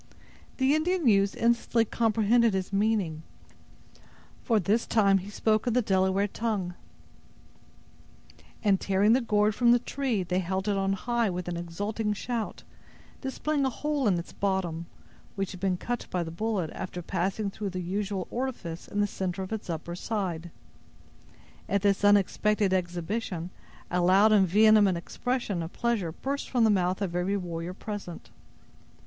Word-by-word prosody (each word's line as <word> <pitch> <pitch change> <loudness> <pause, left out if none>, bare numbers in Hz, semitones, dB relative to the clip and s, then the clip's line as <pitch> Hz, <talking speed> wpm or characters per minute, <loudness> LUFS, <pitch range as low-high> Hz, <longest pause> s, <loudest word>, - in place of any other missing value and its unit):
The 265 +1 +3
Indian 330 0 +1
youths 200 -2 +4
instantly 235 0 +2
comprehended 225 0 +2
his 190 +1 -3
meaning—for 205 - -3
this 210 +5 +1
time 200 -3 +4
he 190 +2 -8
spoke 215 +2 +1
in 240 - +2
the 250 0 +2
Delaware 190 0 +2
tongue—and 200 0 -6
tearing 200 +3 +3
the 260 - +3
gourd 210 -2 +2
from 235 +2 +4
the 240 - +6
tree, 245 -4 -2
they 180 +1 0
held 190 +2 -2
it 205 - +2
on 195 0 +1
high 235 +2 0
with 180 -1 -4
an 175 - -2
exulting 205 +6 -2
shout, 230 +1 -4 0.6
displaying 285 +2 -1
a 265 - +2
hole 290 0 -1
in 185 -4 +3
its 170 - -7
bottom, 180 -4 -1 0.5
which 195 -1 -2
had 185 - -9
been 190 -1 0
cut 240 +5 -4
by 180 -1 -1
the 165 - -6
bullet, 190 -2 -2
after 180 -1 -6
passing 195 +3 -1
through 205 0 -4
the 185 -1 -4
usual 190 +1 -2
orifice 235 -10 -4
in 205 - -1
the - - +3
center 190 -2 -3
of 190 - -6
its 215 -4 -5
upper 170 +1 -4
side. 180 -5 -3 1.2
At 200 0 +1
this 200 0 +2
unexpected 205 0 +3
exhibition, 180 0 -2 0.4
a 180 +1 +1
loud 195 +5 +5
and 200 -3 +5
vehement 210 -1 +5
expression 225 0 -2
of 165 +1 -5
pleasure 230 -8 -1
burst 275 - -4
from 245 -3 +2
the 220 - +5
mouth 185 0 +1
of 175 -3 -3
every 185 +3 0
warrior 175 -1 -5
present. 205 -5 -7
200 Hz, 155 wpm, -28 LUFS, 180-225 Hz, 1.2 s, the